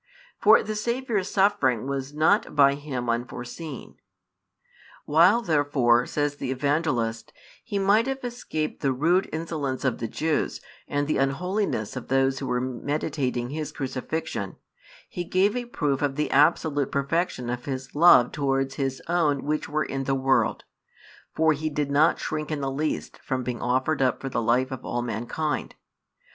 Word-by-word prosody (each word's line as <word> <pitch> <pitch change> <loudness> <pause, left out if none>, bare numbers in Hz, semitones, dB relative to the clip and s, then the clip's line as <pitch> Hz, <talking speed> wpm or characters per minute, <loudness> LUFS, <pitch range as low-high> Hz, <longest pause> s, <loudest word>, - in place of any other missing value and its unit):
For - - +6
the 215 - -3
Saviour's 225 -2 -1
suffering 190 - +2
was 135 0 -3
not 160 +8 +2
by 140 -1 +6
Him 140 -4 -5
unforeseen. 120 +5 -5 1.1
While 175 +10 +5
therefore, 140 - +2
says 145 -1 -1
the 135 - -4
Evangelist, 130 -5 -1 0.3
He 205 -4 -3
might 205 +5 +3
have 270 -1 -3
escaped 235 -11 -4
the 135 -2 +1
rude 170 +8 +2
insolence 150 -5 -3
of 130 - 0
the 115 - -2
Jews 155 +6 -1 0.3
and 145 0 0
the 155 - +1
unholiness 155 - -1
of - - -6
those 135 0 +2
who 135 - -4
were 125 - 0
meditating 130 0 -2
His 155 0 -4
Crucifixion, 130 - -4 0.5
He 175 - -5
gave 190 +5 +2
a 245 -1 -2
proof 145 - -1
of 140 -2 0
the 150 +1 -1
absolute 145 -1 +3
perfection 140 -3 -1
of 125 0 -5
His 130 -1 -5
love 150 -6 +6
towards 135 -2 0
His 135 -1 -2
own 160 -5 +1
which 150 +1 -2
were 155 +1 0
in 135 0 -3
the 135 - +1
world; 135 0 +1 0.7
for 160 0 +4
He 155 +2 -3
did 145 -1 -2
not 155 +4 +4
shrink 155 -1 -3
in 150 -2 -2
the 135 -1 -1
least 150 +3 -3
from 130 -2 -3
being 125 -1 -4
offered 130 +5 0
up 130 -1 +2
for 135 - -4
the 115 - -1
life 125 +4 +1
of 130 -1 -6
all 120 - -2
mankind. 120 +7 -3
145 Hz, 160 wpm, -25 LUFS, 130-160 Hz, 1.1 s, For